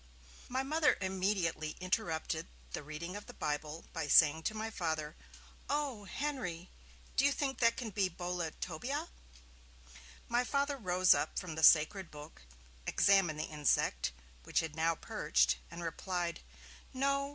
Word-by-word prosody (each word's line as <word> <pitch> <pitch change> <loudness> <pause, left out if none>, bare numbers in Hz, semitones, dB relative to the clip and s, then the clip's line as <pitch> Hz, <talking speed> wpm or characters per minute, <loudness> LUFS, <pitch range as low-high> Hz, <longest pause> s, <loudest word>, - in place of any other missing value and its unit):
My 260 +2 0
Mother 305 +2 +3
immediately 185 -5 -1
interrupted 185 -3 -1 0.2
the - - -4
reading 155 +5 -6
of 205 - -8
the - - -10
Bible 150 +2 -3
by - - -2
saying 155 +1 +6
to 215 - -10
my 220 +1 -3
Father, 160 -6 -2 0.5
'O! 275 -8 -1
Henry, 195 - -4 0.4
do 270 - +3
you 285 - +5
think 275 -1 -2
that 230 -1 +4
can 230 -4 -4
be 195 -1 +1
"Boletobia"?' 180 - -4 1.2
My 240 +1 +2
Father 280 +2 0
rose 185 -4 +4
up - - -2
from 180 -3 -3
the 160 - -4
sacred 165 +4 +5
book, 150 +1 -11 0.5
examined 190 -6 +4
the - - 0
insect, 150 - +1 0.3
which - - +1
had 160 -2 -5
now 165 +1 +2
perched, 65 - +1
and 170 +1 -7
replied: 175 0 -2 0.6
'No! 275 +1 +1
180 Hz, 140 wpm, -34 LUFS, 160-240 Hz, 1.2 s, saying